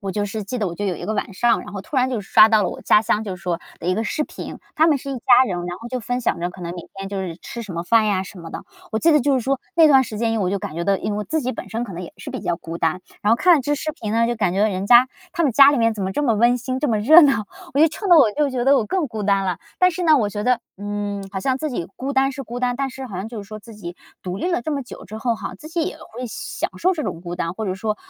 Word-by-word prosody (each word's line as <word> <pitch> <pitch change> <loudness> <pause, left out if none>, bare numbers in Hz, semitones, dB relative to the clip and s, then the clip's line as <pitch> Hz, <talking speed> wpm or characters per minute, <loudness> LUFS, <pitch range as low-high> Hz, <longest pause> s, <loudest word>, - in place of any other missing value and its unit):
我 195 - -2
就 205 -1 -1
是 215 0 -5
记 245 +5 -4
得 205 -4 0
我 170 - -6
就 205 - -4
有 190 - 0
一 - - -7
个 215 - -1
晚 205 - -3
上， 230 +4 +2
然 - - -10
后 200 - -5
突 265 +8 -7
然 255 0 +2
就 235 -5 -2
刷 215 +2 +6
到 215 -2 +4
了 - - 0
我 - - -8
家 210 - +5
乡 220 0 0
就 190 -3 -4
是 - - -17
说 175 -2 -1 0.2
的 170 - -6
一 185 - +2
个 220 +3 -1
视 300 - -1
频。 - - -8 0.2
他 320 +2 +4
们 295 -4 +3
是 275 - -9
一 270 - -3
家 250 +1 +5
人， 175 -3 -3
然 175 0 -5
后 235 - -8
就 255 +1 -3
分 245 +2 -3
享 - - 0
着 175 - -2
可 185 - -13
能 175 0 -5
每 175 - -7
天 195 0 -6
就 195 -1 -3
是 170 -3 -5
吃 235 +4 -7
什 205 - -8
么 170 0 -3
饭 220 +4 +3
呀 195 -3 +1
什 190 0 -11
么 165 -1 -9
的。 - - -7 0.3
我 220 - +1
记 330 +4 +4
得 300 - +6
就 285 +2 +1
是 260 - +2
说， 270 +2 0 0.2
那 325 -2 +7
段 270 -2 +6
时 215 -2 -7
间 230 -1 0
因 225 - 0
为 - - +1
我 180 - 0
就 200 - -1
感 155 - -6
觉 170 +1 -3
到， 200 - +3
因 210 - -3
为 205 - -2
我 210 - -3
自 315 +6 -1
己 255 0 -2
本 - - -8
身 230 +2 -2
可 195 - -8
能 175 - -6
也 170 - -9
是 - - -8
比 - - -5
较 175 - -1
孤 165 +1 -7
单， 165 +2 0 0.2
然 210 - +3
后 230 - +4
看 360 +5 +5
了 275 - -1
这 290 +3 0
视 310 +1 -3
频 220 -9 -5
呢， 230 +1 +3
就 240 0 -1
感 195 -5 +1
觉 195 - 0
到 215 - +4
人 190 0 -3
家 245 +2 +7 0.2
他 340 - 0
们 290 - +3
家 280 +3 +8
里 285 - +1
面 230 -1 +2
怎 205 - -4
么 190 - -2
这 295 - -1
么 235 -6 +2
温 240 +3 +3
馨、 255 +2 -3
这 295 - 0
么 220 -3 +1
热 315 +11 +8
闹， 250 -8 +3 0.3
我 285 - +1
就 320 - +7
衬 355 +6 -6
得 340 - +9
我 235 -7 +6
就 290 +4 +1
觉 250 -2 -2
得 275 +1 +5
我 225 - +1
更 320 - -1
孤 220 -2 -5
单 195 -1 +2
了。 180 -1 -1 0.2
但 365 0 +5
是 360 +1 -4
呢， 310 -4 +5
我 210 - +1
觉 205 0 -4
得， 250 -1 +2 0.2
嗯， 205 0 -4
好 190 - -3
像 260 +4 0
自 305 +1 -3
己 175 -9 -4
孤 275 +2 -3
单 270 0 +2
是 275 0 -6
孤 240 +1 -7
单， 245 -1 0
但 270 0 -2
是 265 +1 -7
好 200 - -8
像 190 +3 -4
就 225 -2 -7
是 195 - -16
说 215 0 -7
自 225 +1 -13
己 175 -4 -8 0.3
独 180 0 -4
立 350 - -2
了 - - +1
这 310 - -4
么 280 -2 -2
久 245 - -11
之 215 - -8
后 230 +1 0
哈， - - -6
自 310 - -12
己 330 0 -1
也 370 - -5
会 250 +3 -8
享 225 - -4
受 370 +2 +2
这 310 -4 -3
种 165 - -5
孤 175 -1 -5
单。 170 -1 -3
或 220 +2 -4
者 185 -2 -2
说， 215 +2 -2
225 Hz, 380 characters per minute, -21 LUFS, 195-265 Hz, 0.3 s, 得